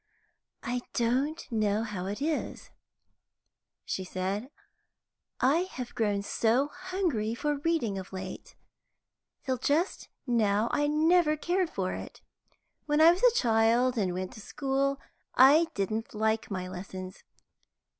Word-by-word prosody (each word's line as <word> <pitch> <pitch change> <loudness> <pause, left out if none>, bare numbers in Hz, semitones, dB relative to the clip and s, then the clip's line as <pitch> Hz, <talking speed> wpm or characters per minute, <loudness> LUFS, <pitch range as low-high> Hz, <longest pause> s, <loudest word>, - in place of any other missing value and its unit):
"I 245 +1 -2
don't 265 +7 0
know 215 -1 +1
how 200 -5 -4
it 210 +8 -4
is," 315 0 -3 1.1
she 190 - -3
said, 190 +6 -3 0.9
"I 275 +6 +4
have 250 -1 -6
grown 205 -3 0
so 235 +7 +1
hungry 345 - -2
for 295 +3 -1
reading 285 -11 0
of 190 - -9
late. 185 -1 -7 0.9
Till 260 -2 -1
just 320 - 0 0.2
now 220 -3 +2
I 290 0 +1
never 310 +1 +3
cared 355 +3 0
for 185 - -2
it. - - -8 0.7
When 295 0 +2
I 320 +2 +8
was 355 +3 -2
a - - +5
child 235 +2 +3
and 195 -6 0
went 185 0 -4
to 215 - -10
school, 275 +3 -1 0.4
I 290 +6 +7
didn't 215 +3 -2
like 220 +1 0
my 185 -2 -4
lessons. 185 +1 -8
240 Hz, 130 wpm, -29 LUFS, 205-295 Hz, 1.1 s, I